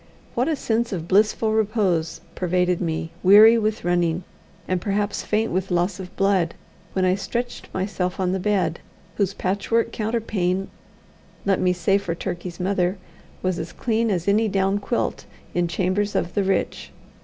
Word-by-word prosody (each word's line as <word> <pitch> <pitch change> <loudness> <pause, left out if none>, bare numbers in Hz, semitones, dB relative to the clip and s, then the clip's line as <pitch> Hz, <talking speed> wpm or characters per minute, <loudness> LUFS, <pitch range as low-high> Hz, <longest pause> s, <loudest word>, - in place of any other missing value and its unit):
What 245 +3 +1
a 320 - +1
sense 235 -3 -1
of 170 -4 -4
blissful 215 +3 +3
repose 200 -7 0
pervaded 180 0 +1
me, 160 -1 -2
weary 215 +4 +8
with 215 0 -1
running, 175 0 +1 0.4
and 185 -1 0
perhaps 205 +1 -1
faint 220 +1 0
with 185 +1 -1
loss 180 +2 0
of 180 -1 -9
blood, 195 -4 +2 0.4
when 190 -1 +1
I 185 - +4
stretched 240 +5 -4
myself 185 -1 -2
on 185 -1 +1
the 190 - 0
bed, 185 -4 0 0.4
whose 200 -1 0
patchwork 205 +5 0
counterpane, 210 -5 -1 0.8
let 195 -2 +2
me 180 - +3
say 180 +3 +2
for 170 -4 -3
Turkey's 175 -1 -5
mother, 185 0 0 0.5
was 185 -2 0
as 160 - -5
clean 230 -1 0
as 180 -3 -1
any 215 +3 +3
down 195 0 +1
quilt 235 +4 -2 0.3
in 175 0 +1
chambers 185 +4 0
of 175 - -1
the 205 - +1
rich. 195 0 -1
190 Hz, 160 wpm, -23 LUFS, 180-210 Hz, 0.8 s, weary